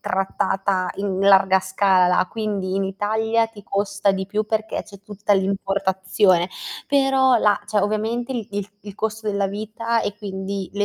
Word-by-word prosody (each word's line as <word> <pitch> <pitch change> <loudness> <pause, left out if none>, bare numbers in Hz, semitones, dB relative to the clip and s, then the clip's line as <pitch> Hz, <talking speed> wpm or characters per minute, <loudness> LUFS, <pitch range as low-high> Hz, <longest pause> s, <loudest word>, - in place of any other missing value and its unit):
trattata 190 0 -1
in 195 -1 -2
larga 195 -1 +5
scala, 185 -1 +3
quindi 205 -4 -3
in 195 0 0
Italia 220 +4 0
ti 215 -2 -14
costa 200 0 0
di 190 0 -3
più 210 +2 -1
perché 220 0 -2
c'è 200 -2 -14
tutta 205 0 -1
l'importazione, 190 -1 +1 0.4
però 270 -2 +3
la 210 -2 +3
cioè 210 0 0
ovviamente 220 +5 -1
il 230 -5 -4
il 205 0 -4
il 205 -2 -9
costo 220 0 -3
della 200 -1 0
vita, 220 +3 -2
e 205 - -3
quindi 195 -1 -5
le 205 0 0
200 Hz, 155 wpm, -22 LUFS, 190-215 Hz, 0.4 s, larga